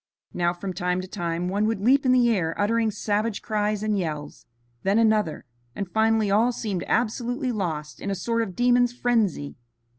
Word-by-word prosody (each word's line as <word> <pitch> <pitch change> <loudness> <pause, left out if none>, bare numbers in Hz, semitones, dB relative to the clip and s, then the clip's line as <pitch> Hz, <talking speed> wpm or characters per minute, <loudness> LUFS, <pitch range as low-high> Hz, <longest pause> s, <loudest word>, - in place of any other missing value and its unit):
Now, 175 -1 +1
from 185 +2 -5
time 180 0 -1
to 185 - -8
time, 175 -2 -3
one 205 +3 0
would 225 -2 -1
leap 260 +6 +3
in - - +5
the 250 -1 +4
air 165 -6 -1
uttering 225 +2 +2
savage 210 +1 -2
cries 210 -1 -1
and 215 -1 +1
yells, 155 -6 -4 0.3
then 195 +2 +2
another, 215 -10 +2 0.3
and 200 - -3
finally 220 +1 +2
all 225 +5 +4
seemed 205 -7 -3
absolutely 245 +3 0
lost 160 -8 -4
in 200 - -3
a 195 - -1
sort 230 +5 -1
of 195 -6 -4
demon's 245 0 +3
frenzy. 220 -14 0
210 Hz, 180 wpm, -25 LUFS, 180-230 Hz, 0.3 s, in